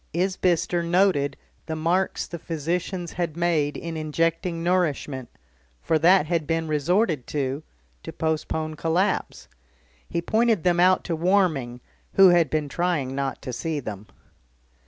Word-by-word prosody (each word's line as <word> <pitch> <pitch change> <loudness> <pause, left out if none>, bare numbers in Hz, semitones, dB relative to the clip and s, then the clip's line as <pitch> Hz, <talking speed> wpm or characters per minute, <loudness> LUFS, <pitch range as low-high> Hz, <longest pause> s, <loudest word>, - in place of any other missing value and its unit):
Isbister 180 -1 +1
noted 170 -5 +2 0.3
the 160 - -3
marks 170 +4 0
the 170 - -7
physicians 170 +2 -3
had 170 -3 -3
made 160 -4 +1
in 165 -1 -6
injecting 165 +2 -1
nourishment, 150 -8 -1 0.5
for 160 - +1
that 175 +1 +5
had 165 -2 -1
been 165 0 -1
resorted 155 - +1
to 140 0 -2 0.4
to - - -7
postpone 155 0 -2
collapse; 180 +5 -1 0.6
he 170 - -1
pointed 220 +1 +1
them 175 -1 +2
out 185 +1 +4
to 170 - -2
Warming, 160 -9 +1 0.3
who 195 -1 +8
had 170 -4 +4
been 155 0 -1
trying 155 -5 -1
not 135 0 -3
to 125 - -5
see 150 +6 -2
them. 105 -5 -7
165 Hz, 135 wpm, -24 LUFS, 150-180 Hz, 0.6 s, who